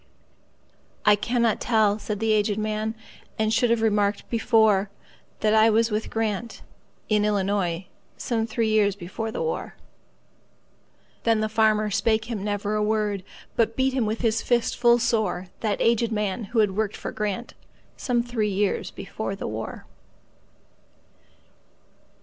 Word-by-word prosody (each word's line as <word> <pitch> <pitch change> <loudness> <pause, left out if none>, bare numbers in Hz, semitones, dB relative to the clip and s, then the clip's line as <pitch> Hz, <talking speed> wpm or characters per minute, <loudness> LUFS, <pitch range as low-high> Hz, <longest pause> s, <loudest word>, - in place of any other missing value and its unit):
"I 210 0 +7
cannot 235 +1 0
tell," 220 -3 +2
said 210 -1 -4
the 225 0 +1
aged 210 -1 +2
man,"And 215 0 -3
should 235 +1 +3
have 230 -1 +2
remarked 205 -2 +1
before, 220 -4 +3 0.5
That 215 0 +3
I 220 +1 +6
was 225 +1 +2
with 215 +1 -2
Grant,—in 215 -1 -3
Illinois,—Some 200 +3 -2
three 225 0 0
years 210 -2 +3
before 200 +4 -5
the - - -3
war."Then 230 - -6
the 215 - +1
farmer 215 -1 +2
spake 220 +2 +1
him 220 -4 -4
never 205 0 -2
a 215 - +1
word, 210 -2 0 0.3
But 225 -1 +1
beat 260 0 +1
with 220 0 -1
his 230 -1 +1
fist 240 -2 +1
full 240 0 +5
soreThat 215 -3 -1
aged 230 0 +2
man, 210 0 -2
who 235 +4 -5
had 200 -3 +1
worked 215 -1 -1
for - - -6
GrantSome 235 +3 -4
three 220 -3 0
years 200 0 0
before 195 0 -5
the - - -5
war. 110 +1 -6
215 Hz, 130 wpm, -25 LUFS, 205-225 Hz, 0.5 s, I